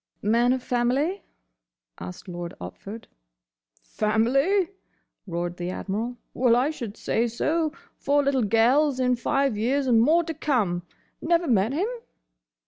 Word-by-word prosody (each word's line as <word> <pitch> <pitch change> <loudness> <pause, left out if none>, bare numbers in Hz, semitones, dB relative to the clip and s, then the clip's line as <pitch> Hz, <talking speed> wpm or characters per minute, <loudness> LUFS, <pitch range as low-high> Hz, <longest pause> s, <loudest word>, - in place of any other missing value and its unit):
"Man 235 +4 +3
of 255 -1 -1
family?" 265 +10 0 0.8
asked 90 - -8
Lord 175 -1 -6
Otford. 200 - -8 0.8
"Family?" 265 - +1 0.6
roared 175 0 -3
the 175 0 -3
Admiral. 220 +6 -3 0.2
"Well, 245 -2 +3
I 260 +5 +2
should 230 -8 -7
say 235 +1 0
so. 310 +7 0 0.3
Four 285 +1 +2
little 275 -2 +1
gels 250 +6 +3
in 250 -1 +2
five 275 +1 0
years, 260 +6 0
and 235 -3 +4
more 320 +8 +4
to 325 0 -4
come! 230 - 0 0.4
Never 340 +1 +2
met 220 -2 +2
him?" 355 +8 0
245 Hz, 135 wpm, -25 LUFS, 215-285 Hz, 0.8 s, and